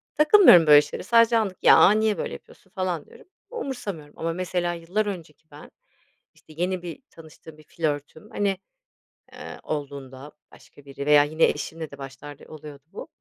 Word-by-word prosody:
takılmıyorum 300 - +6
böyle 150 -1 +8
şeylere. - - -8
Sadece 230 0 +4
anlık, 195 -4 -3
"ya, - - +7
niye 215 0 +1
böyle - - -5
yapıyorsun?" 190 - -15
falan 185 -5 -4
diyorum. - - -18 0.2
Umursamıyorum 225 - -7
ama 165 0 -3
mesela 175 -1 -3
yıllar 175 +6 -3
önceki 160 -6 -9
ben, 145 +1 -14 0.6
işte, 155 - -19
yeni 180 +1 -2
bir 175 +5 -9
tanıştığım 160 -1 -15
bir 155 - -18
flörtüm, 150 -1 -5
hani, 200 -2 -1 0.8
ııı, - - -10
olduğunda 140 -1 -7 0.2
başka 145 - -19
biri 140 0 -8
veya 150 0 +5
yine 155 +2 -2
eşimle 160 +2 -4
de 140 - -11
başlarda 135 +1 -11
oluyordu 150 -2 -12
bu. - - -8
165 Hz, 160 wpm, -24 LUFS, 145-190 Hz, 0.8 s, böyle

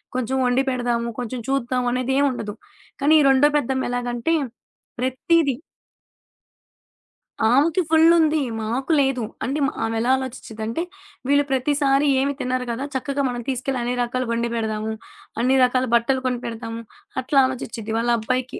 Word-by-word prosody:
కొంచెం 255 +1 -1
వండి 250 +1 +3
పెడదాము, 240 -2 -1
కొంచెం 245 +1 -4
చూద్దాం 255 -2 0
అనేదేమి 265 +3 +1
ఉండదు. 210 -4 -5 0.5
కానీ 290 +3 +4
ఈ - - +3
రెండో 270 +2 +5
పెద్దమ్మ 265 -1 -1
ఎలాగంటే, 245 +4 -1 0.7
ప్రతీది 270 +3 +1 2.0
ఆమెకి 305 +7 +3
ఫుల్ 325 +1 +6
ఉంది. 315 -2 +3 0.2
మాకు 245 +8 -2
లేదు. 270 -3 +1 0.2
అంటే 280 +4 -1
మా - - -2
ఆమెలా 225 +2 -1
ఆలోచిచ్చిదంటే 230 -1 -5 0.5
వీళ్ళు 285 +1 +4
ప్రతిసారి 275 +1 +2
ఏమి 280 +1 +1
తినరు 255 0 -1
గదా! 245 +4 -3
చక్కగా 280 +2 -1
మనం 245 -1 -4
తీసుకెళ్ళి 260 0 -2
అన్ని 245 +1 -1
రకాలు 255 +1 -2
ఒండి 235 0 -1
పెడదాము. 220 -1 -2 0.5
అన్ని 255 +3 +3
రకాల 255 +1 +2
బట్టలు 260 +3 +2
కొనిపెడతాము. 230 -2 -4 0.4
అట్లా 275 +2 +2
ఆలోచిచ్చిద్ది. 235 -4 -5
వాళ్ళబ్బాయికి 240 +2 -1
255 Hz, 130 wpm, -22 LUFS, 235-275 Hz, 2.0 s, ఫుల్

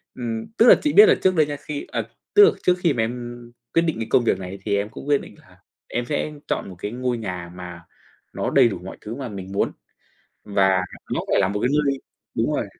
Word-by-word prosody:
ừm, 115 -2 -4
tức 230 - +6
là - - +10
chị 300 - 0
biết 420 - +10
là - - +6
trước 185 -1 +3
đây 155 -2 +4
nha 145 - -4
khi 145 0 -6
ờ, - - -1 0.3
tức 415 0 +9
là 415 - +7
trước 180 - +5
khi 170 -5 +2
mà 115 -3 0
em 120 +1 -5 0.4
quyết 165 - +4
định 165 -2 0
cái 115 - -3
công 120 - +4
việc 95 -4 +1
này 95 +1 -6
thì 100 - +1
em 100 +1 -2
cũng 135 - -10
quyết 145 -1 +3
định - - -12
là - - -21 0.3
em 120 0 -2
sẽ 150 +2 -2 0.2
chọn - - -2
một 95 - -10
cái 105 - -4
ngôi 125 0 -2
nhà 90 -5 -5
mà 90 -2 -8 0.5
nó - - -2
đầy - - +5
đủ 95 -6 -4
mọi 95 - -8
thứ 110 +3 -6
mà 135 -2 -5
mình 95 -2 -7
muốn. 100 - 0 0.7
Và 95 -2 +3 0.3
nó - - 0
phải - - +4
là 95 - +3
một 105 +1 -2
cái 125 - +2
nơi 140 -2 +1 0.4
đúng - - +1
rồi. - - -1
120 Hz, 255 wpm, -23 LUFS, 100-145 Hz, 0.7 s, là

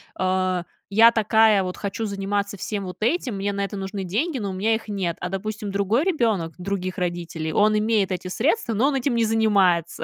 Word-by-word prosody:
а, 185 -1 0 0.3
я 225 +4 +7
такая 220 -2 +4
вот 180 0 -5
хочу 210 +2 -3
заниматься 200 0 -2
всем 200 +1 -4
вот 180 -1 -7
этим, 250 - 0
мне 200 +1 -2
на 200 - -2
это 200 +1 -4
нужны 195 0 -4
деньги, 255 - -1
но 200 -3 -3
у - - -4
меня 210 +4 +1
их 220 - -7
нет. 190 -5 -2
А, 180 - -3
допустим, 210 +2 -4
другой 200 - +1
ребенок 220 - 0
других 185 0 -3
родителей, 170 -3 -3
он 215 +1 +3
имеет 210 -3 +1
эти 185 0 -3
средства, 245 - 0
но 235 +6 +2
он 290 - 0
этим 265 -2 0
не 230 - +2
занимается, 200 -7 +2
200 Hz, 205 wpm, -23 LUFS, 185-220 Hz, 0.3 s, я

